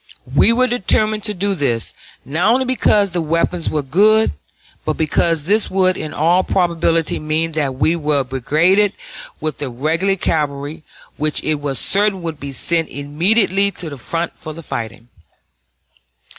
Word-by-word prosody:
We -, -, +5 dB
were 250 Hz, +2 st, +3 dB
determined 215 Hz, -3 st, +1 dB
to 210 Hz, -2 st, -1 dB
do 200 Hz, +2 st, 0 dB
this, 130 Hz, -9 st, -1 dB, 0.3 s
not 165 Hz, -, +1 dB
only 260 Hz, +2 st, +2 dB
because 210 Hz, -6 st, +2 dB
the 175 Hz, -1 st, -1 dB
weapons 165 Hz, +2 st, 0 dB
were 150 Hz, -2 st, -1 dB
good, 210 Hz, +10 st, +3 dB, 0.5 s
but -, -, -2 dB
because 160 Hz, 0 st, +1 dB
this 205 Hz, +6 st, +1 dB
would 185 Hz, -1 st, +2 dB
in 155 Hz, -3 st, -5 dB
all 175 Hz, +4 st, +2 dB
probability 170 Hz, -3 st, 0 dB
mean 155 Hz, +2 st, -1 dB
that 145 Hz, -4 st, -2 dB
we 160 Hz, +5 st, +1 dB
were 150 Hz, -4 st, 0 dB
brigaded 160 Hz, -, +2 dB, 0.5 s
with 155 Hz, -2 st, -3 dB
the 145 Hz, -3 st, -3 dB
regular 160 Hz, +10 st, 0 dB
cavalry, 150 Hz, -2 st, -2 dB, 0.3 s
which 150 Hz, 0 st, -1 dB
it 155 Hz, -2 st, -1 dB
was 140 Hz, -2 st, -1 dB
certain 200 Hz, -, +3 dB
would 160 Hz, -3 st, -5 dB
be 140 Hz, -1 st, -6 dB
sent 165 Hz, +4 st, +1 dB
immediately 190 Hz, +8 st, +1 dB
to 170 Hz, -5 st, -7 dB
the 140 Hz, -, -7 dB
front 165 Hz, +6 st, -4 dB
for 155 Hz, -1 st, -9 dB
the 165 Hz, -, -10 dB
fighting. 115 Hz, -2 st, -6 dB
165 Hz, 155 wpm, -18 LUFS, 150-195 Hz, 0.5 s, We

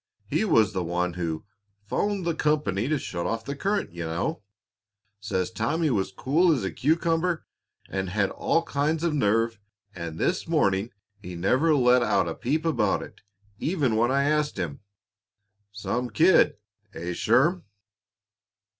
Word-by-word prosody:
He -, -, 0 dB
was 110 Hz, -, +3 dB
the 95 Hz, -2 st, -1 dB
one 90 Hz, +1 st, -1 dB
who 85 Hz, -2 st, -3 dB, 0.4 s
'phoned 200 Hz, -, -1 dB
the 170 Hz, -, +1 dB
company 145 Hz, -10 st, 0 dB
to 155 Hz, +1 st, +1 dB
shut 85 Hz, -9 st, -4 dB
off 115 Hz, 0 st, -3 dB
the 140 Hz, -, -4 dB
current, 200 Hz, -, -1 dB
you 85 Hz, 0 st, -5 dB
know. 85 Hz, -, -2 dB, 0.8 s
Says 100 Hz, -2 st, -2 dB
Tommy 145 Hz, -, 0 dB
was 95 Hz, -4 st, 0 dB
cool 155 Hz, -, +2 dB
as 135 Hz, -9 st, +1 dB
a 95 Hz, -, -2 dB
cucumber 165 Hz, +3 st, 0 dB, 0.4 s
and 95 Hz, -1 st, -3 dB
had 100 Hz, +1 st, 0 dB
all 165 Hz, -, +1 dB
kinds 155 Hz, +1 st, -1 dB
of 170 Hz, -3 st, +1 dB
nerve 115 Hz, -3 st, +1 dB, 0.3 s
And 85 Hz, -3 st, -6 dB
this 180 Hz, -, 0 dB
morning 105 Hz, -, +1 dB, 0.3 s
he 90 Hz, -3 st, -8 dB
never 130 Hz, -, +2 dB
let 125 Hz, -2 st, +4 dB
out 100 Hz, -6 st, +2 dB
a 85 Hz, -, -2 dB
peep 155 Hz, -, -2 dB
about 120 Hz, -11 st, +1 dB
it, -, -, -13 dB, 0.4 s
even 150 Hz, -9 st, 0 dB
when 120 Hz, +2 st, +3 dB
I 140 Hz, +1 st, +2 dB
asked 150 Hz, -1 st, +1 dB
him. 85 Hz, -7 st, -3 dB, 0.9 s
Some 120 Hz, +5 st, -3 dB
kid, 165 Hz, -, +4 dB, 0.4 s
eh, 85 Hz, +2 st, -4 dB
Sherm?" 145 Hz, -, +2 dB
120 Hz, 155 wpm, -26 LUFS, 95-155 Hz, 0.9 s, let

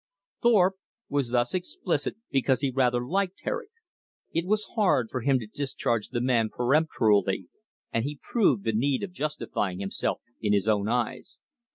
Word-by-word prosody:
Thorpe 195 Hz, -5 st, +4 dB, 0.3 s
was 140 Hz, -4 st, 0 dB
thus 120 Hz, 0 st, +1 dB
explicit 180 Hz, -4 st, -2 dB, 0.2 s
because 135 Hz, -1 st, +2 dB
he 140 Hz, -2 st, +1 dB
rather 125 Hz, -1 st, +2 dB
liked 190 Hz, +5 st, -1 dB
Herrick. 485 Hz, -4 st, -3 dB, 0.6 s
It 165 Hz, +2 st, 0 dB
was 215 Hz, +1 st, +1 dB
hard 180 Hz, -, +2 dB
for 130 Hz, -, -2 dB
him 135 Hz, +2 st, +3 dB
to 120 Hz, -, -5 dB
discharge 120 Hz, -2 st, -2 dB
the 120 Hz, -, -2 dB
man 120 Hz, -3 st, +2 dB
peremptorily, 120 Hz, -, +2 dB, 0.4 s
and 115 Hz, -, +1 dB
he 145 Hz, +1 st, -4 dB
proved 150 Hz, -, +2 dB
the 115 Hz, -, +1 dB
need 130 Hz, -, +1 dB
of 195 Hz, -, -4 dB
justifying 150 Hz, -, -2 dB
himself 100 Hz, 0 st, -2 dB, 0.2 s
in 105 Hz, -1 st, +2 dB
his 100 Hz, 0 st, +2 dB
own 105 Hz, -2 st, +2 dB
eyes. 120 Hz, -1 st, -2 dB
130 Hz, 160 wpm, -27 LUFS, 115-170 Hz, 0.6 s, Thorpe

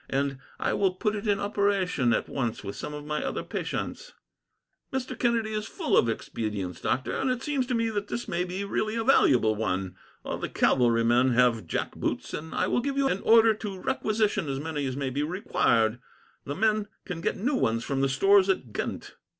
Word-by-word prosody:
And 135 Hz, 0 st, -1 dB, 0.2 s
I -, -, 0 dB
will 190 Hz, -2 st, +1 dB
put 210 Hz, +3 st, 0 dB
it 205 Hz, +1 st, -4 dB
in 205 Hz, -1 st, +2 dB
operation, 200 Hz, -, +1 dB
at -, -, +1 dB
once, 120 Hz, -6 st, -3 dB
with 100 Hz, 0 st, -5 dB
some -, -, -5 dB
of 150 Hz, 0 st, -7 dB
my 150 Hz, 0 st, -2 dB
other -, -, -3 dB
patients." -, -, -4 dB, 0.8 s
"Mr. 265 Hz, -1 st, -3 dB
Kennedy 230 Hz, -3 st, 0 dB
is 215 Hz, 0 st, -2 dB
full 330 Hz, -6 st, -1 dB
of 115 Hz, -, +4 dB
expedients, 105 Hz, -5 st, -4 dB
doctor, 130 Hz, -, -1 dB
and 270 Hz, -, 0 dB
it 255 Hz, 0 st, -1 dB
seems 275 Hz, -4 st, -1 dB
to 250 Hz, -, 0 dB
me 230 Hz, -1 st, +1 dB
that 205 Hz, -1 st, -3 dB
this 240 Hz, -, -4 dB
may 170 Hz, +1 st, -1 dB
be 185 Hz, +2 st, -4 dB
really 215 Hz, +2 st, -1 dB
a 230 Hz, -, 0 dB
valuable 125 Hz, -, +4 dB
one. 95 Hz, -3 st, -2 dB, 0.3 s
All -, -, -4 dB
the -, -, -3 dB
cavalry 115 Hz, -2 st, +3 dB
men 120 Hz, +2 st, +3 dB
have 115 Hz, -6 st, +3 dB
jack -, -, -3 dB
boots, -, -, -3 dB
and 160 Hz, +1 st, -5 dB
I -, -, +2 dB
will -, -, +1 dB
give 275 Hz, +2 st, -2 dB
you 275 Hz, -1 st, +3 dB
an 195 Hz, -, -1 dB
order 225 Hz, 0 st, +6 dB
to 205 Hz, -3 st, -6 dB
requisition 215 Hz, -, 0 dB
as 135 Hz, 0 st, -2 dB
many 150 Hz, -2 st, -3 dB
as 130 Hz, 0 st, -4 dB
may 135 Hz, -2 st, -2 dB
be 140 Hz, +3 st, -1 dB
required. 120 Hz, -, +1 dB, 0.5 s
The 145 Hz, -, -4 dB
men 215 Hz, +2 st, +1 dB, 0.2 s
can 180 Hz, -3 st, -5 dB
get -, -, -1 dB
new 255 Hz, +9 st, 0 dB
ones 115 Hz, -, +1 dB
from 135 Hz, -1 st, -1 dB
the 135 Hz, -, +2 dB
stores 195 Hz, +8 st, +4 dB
at 130 Hz, -, -1 dB
Ghent." -, -, -5 dB
180 Hz, 210 wpm, -27 LUFS, -, 0.8 s, order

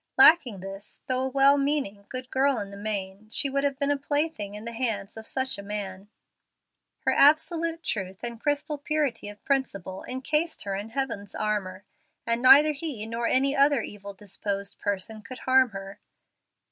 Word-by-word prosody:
Lacking 310 Hz, -, +7 dB
this, 195 Hz, +2 st, -9 dB
though 255 Hz, 0 st, 0 dB
a -, -, -1 dB
well 275 Hz, +1 st, +5 dB
meaning, 270 Hz, -9 st, -1 dB
good 255 Hz, 0 st, -6 dB
girl 270 Hz, 0 st, +2 dB
in 200 Hz, -2 st, -5 dB
the -, -, -9 dB
main, 200 Hz, 0 st, -5 dB
she 275 Hz, +4 st, 0 dB
would 275 Hz, +1 st, 0 dB
have 280 Hz, -1 st, 0 dB
been 285 Hz, 0 st, 0 dB
a 285 Hz, -, +1 dB
plaything 285 Hz, -8 st, -1 dB
in 210 Hz, +2 st, -8 dB
the 235 Hz, -, -4 dB
hands 225 Hz, -4 st, -2 dB
of 220 Hz, 0 st, -8 dB
such 260 Hz, -4 st, -1 dB
a -, -, -5 dB
man. 200 Hz, -1 st, -6 dB, 0.9 s
Her -, -, +1 dB
absolute 325 Hz, +3 st, +3 dB
truth 190 Hz, 0 st, -4 dB
and 235 Hz, -1 st, -5 dB
crystal 290 Hz, 0 st, -1 dB
purity 285 Hz, -7 st, -1 dB
of 205 Hz, 0 st, -14 dB
principle 195 Hz, -9 st, -2 dB
incased 300 Hz, +6 st, -1 dB
her 195 Hz, -1 st, -3 dB
in 205 Hz, +3 st, -5 dB
heaven's 230 Hz, -5 st, -4 dB
armor, 200 Hz, -3 st, -2 dB, 0.4 s
and 230 Hz, 0 st, +1 dB
neither 275 Hz, +4 st, +8 dB
he 280 Hz, -7 st, -4 dB
nor 230 Hz, +1 st, -2 dB
any 275 Hz, +2 st, +3 dB
other 280 Hz, -3 st, +4 dB
evil 200 Hz, -1 st, -9 dB
disposed 200 Hz, 0 st, -4 dB
person 205 Hz, +2 st, -3 dB
could 255 Hz, +4 st, -9 dB
harm 260 Hz, -1 st, +3 dB
her. 195 Hz, -1 st, -9 dB
235 Hz, 175 wpm, -26 LUFS, 200-275 Hz, 0.9 s, neither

